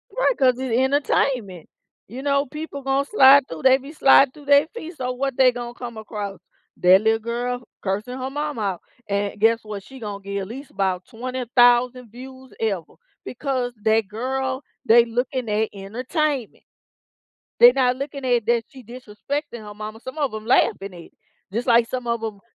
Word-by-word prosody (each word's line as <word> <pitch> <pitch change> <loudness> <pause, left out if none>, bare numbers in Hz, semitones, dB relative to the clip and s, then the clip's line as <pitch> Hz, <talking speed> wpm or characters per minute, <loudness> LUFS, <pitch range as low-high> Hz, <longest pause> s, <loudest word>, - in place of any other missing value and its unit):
Right, - - +1
'cause 255 -2 +3
it 260 -2 -3
entertainment. 255 - 0 0.4
You 245 +6 -8
know, 280 0 +1
people 300 0 -7
gonna 270 +1 0
slide 275 -5 +6
through, 165 - -8
they 265 0 +6
be 275 +2 -11
slide 275 -3 +5
through 295 -1 -15
they 285 +1 +5
feed, 345 -7 -8
so 255 -4 -3
what 270 0 -3
they 260 -1 +6
gonna 240 -1 -6
come 240 -2 -8
across? 205 -3 -6 0.4
That 185 +2 +6
little 220 +1 +2
girl 245 +2 -3 0.2
cursing 210 +6 -3
her 260 0 -4
mama 290 -3 -4
out, 195 -4 -2 0.3
and 200 0 -2
guess 225 +2 +3
what? 210 -2 -7
She 265 +5 -13
gonna 205 -3 -6
get 200 0 -4
at 190 - -5
least 265 +6 -9
about 185 -2 -1
20,000 245 0 +1
views 260 +2 -12
ever, 195 -7 -3 0.3
because 255 -2 -3
that 220 -1 +2
girl, 260 +5 -3 0.2
they 235 -1 +6
looking 245 +1 -3
at 215 +1 0
entertainment. 250 - -3 1.0
They 240 +1 +10
not 255 -1 +2
looking 275 0 -6
at 245 -3 +1
that 235 -1 +2
she 265 -2 -14
disrespecting 245 +3 -6
her 210 0 -9
mama, 215 +1 -8
some 260 +5 -9
of 280 -7 -1
'em 215 0 -7
laughing 200 -5 +2
at 175 - -10
it, - - -15 0.4
just 235 +4 -2
like 235 -1 +4
some 250 -1 -4
of 235 -1 -1
'em 210 -3 -5
245 Hz, 180 wpm, -22 LUFS, 220-265 Hz, 1.0 s, They